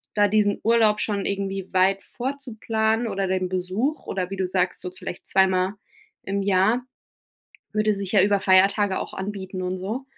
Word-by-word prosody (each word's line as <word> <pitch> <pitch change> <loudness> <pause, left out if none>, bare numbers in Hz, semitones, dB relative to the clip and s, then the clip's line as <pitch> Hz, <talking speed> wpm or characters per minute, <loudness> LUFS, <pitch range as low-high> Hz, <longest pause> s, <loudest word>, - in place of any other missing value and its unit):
da 205 -1 +4
diesen 205 0 +2
Urlaub 220 -2 +4
schon 200 -2 -1
irgendwie 195 -1 -3
weit 195 +1 +2
vorzuplanen 230 -3 -2
oder 195 -2 -1
den 185 0 0
Besuch 185 +11 -2
oder 185 -2 -3
wie 195 - -4
du 190 -1 -1
sagst, 180 0 -1
so 180 - -5
vielleicht 185 -1 -8
zweimal 190 0 +2 0.5
im 200 +1 -2
Jahr, 200 +5 +2 0.9
würde 215 0 +2
sich 195 -1 -5
ja 195 -3 +5
über 200 0 +3
Feiertage 195 +1 +4
auch - - -6
anbieten 190 -1 -5
und 185 +1 -2
so. 215 +8 -4
195 Hz, 165 wpm, -24 LUFS, 185-215 Hz, 0.9 s, ja